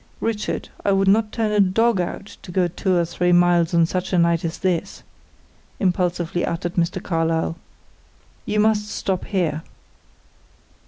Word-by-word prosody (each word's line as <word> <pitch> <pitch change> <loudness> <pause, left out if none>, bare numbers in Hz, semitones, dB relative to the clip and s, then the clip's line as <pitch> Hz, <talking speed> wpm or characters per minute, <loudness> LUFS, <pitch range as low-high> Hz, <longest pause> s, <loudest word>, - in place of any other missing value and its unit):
"Richard, 225 -2 -2
I 200 - +2
would 195 0 +2
not 215 +2 +3
turn 220 -2 -1
a 210 - +2
dog 200 +2 +3
out 195 +3 -6
to 180 - -10
go 180 0 +2
two 185 +2 -1
or 170 - +2
three 175 +1 0
miles 175 -1 +4
on 170 -1 +4
such 185 +2 -3
a 185 - +2
night 170 -1 +2
as 165 -1 -3
this," 185 0 -2 0.8
impulsively 175 -2 0
uttered 170 +1 -2
Mr. 175 +1 0
Carlyle. 165 -1 0 0.9
"You 210 - 0
must 210 -1 +2
stop 190 -3 -2
here." 170 -6 -1
180 Hz, 155 wpm, -22 LUFS, 170-200 Hz, 0.9 s, miles